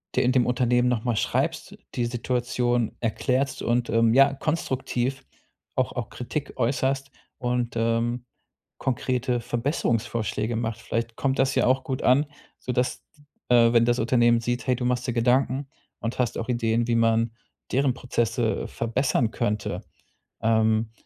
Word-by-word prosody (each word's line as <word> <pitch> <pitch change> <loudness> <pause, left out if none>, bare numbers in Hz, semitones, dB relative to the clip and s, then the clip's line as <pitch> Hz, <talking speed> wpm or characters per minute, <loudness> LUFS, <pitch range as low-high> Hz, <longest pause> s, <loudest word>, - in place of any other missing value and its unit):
der - - +3
äh, - - +4
dem 125 -2 +3
Unternehmen 125 0 +2
noch 120 -3 0
mal 120 -2 0
schreibst, 160 - -1 0.2
die 120 - 0
Situation 120 -1 0
erklärst 130 +4 0
und, 120 0 0
ähm, 115 0 +3
ja, 135 +2 +6
konstruktiv 135 -3 -2 0.5
auch - - 0
auch - - -4
Kritik 140 +4 -5
äußerst 135 +2 0 0.3
und, 125 -2 -1
ähm, 115 +2 0 0.5
konkrete 125 -1 -1
Verbesserungsvorschläge 115 - -1
macht. 115 0 -3
Vielleicht 115 0 -3
kommt 135 +1 0
das 135 0 +3
ja - - +3
auch 130 +1 +2
gut 135 -5 -3
an, 135 +4 +4 0.3
so - - -4
dass 125 +1 -1 0.5
d 125 - +6
äh, 115 0 +5
wenn 115 -1 +5
das 120 +1 +2
Unternehmen 120 0 +3
sieht, 120 +1 -2
hey, 125 - +3
du 125 - -3
machst 125 0 0
dir 120 - -1
Gedanken 130 +3 +2 0.3
und 115 +1 -4
hast 125 -3 0
auch 115 - -4
Ideen, 115 -1 +1
wie 120 - +2
man 115 0 +2 0.4
deren 135 0 +2
Prozesse 115 -2 -1
verbessern 115 +1 0
könnte. 105 -3 -2 0.6
Ähm, 110 0 +2
120 Hz, 155 wpm, -25 LUFS, 115-130 Hz, 0.6 s, ja